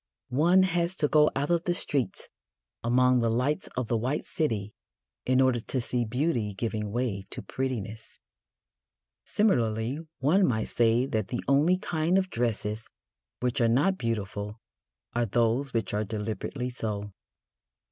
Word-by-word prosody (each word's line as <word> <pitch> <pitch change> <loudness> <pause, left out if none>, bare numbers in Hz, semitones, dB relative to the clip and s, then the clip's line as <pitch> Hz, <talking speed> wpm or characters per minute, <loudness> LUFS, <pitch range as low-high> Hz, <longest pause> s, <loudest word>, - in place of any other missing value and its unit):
One 170 +9 +4
has 175 0 +1
to 150 - +2
go 150 0 +5
out 145 +4 0
of 170 0 +1
the 175 - +1
streets 135 - -1 0.6
among 125 +2 +4
the 115 -1 +2
lights 125 +6 0
of 125 -2 -1
the 115 - +1
White 130 +6 -1
City 110 -9 -2 0.5
in 130 0 +4
order 130 -2 +4
to 130 +3 -3
see 120 0 -1
beauty 120 -4 -1
giving 105 -1 -2
way 115 -4 -1
to - - -5
prettiness. 115 -5 -4 1.1
Similarly, 120 - +1 0.2
one 180 +9 +3
might 110 -3 0
say 120 +1 +3
that 110 -6 -1
the 120 - -3
only 150 +7 +4
kind 170 0 +1
of 185 -1 0
dresses 110 -2 -2 0.5
which 125 +1 0
are 115 - +5
not 165 +11 +2
beautiful 105 -2 -3 0.5
are 120 0 +1
those 120 +5 +1
which 115 -2 -1
are 105 +1 +1
deliberately 110 +4 -4
so. 105 -4 -4
125 Hz, 145 wpm, -28 LUFS, 110-145 Hz, 1.1 s, go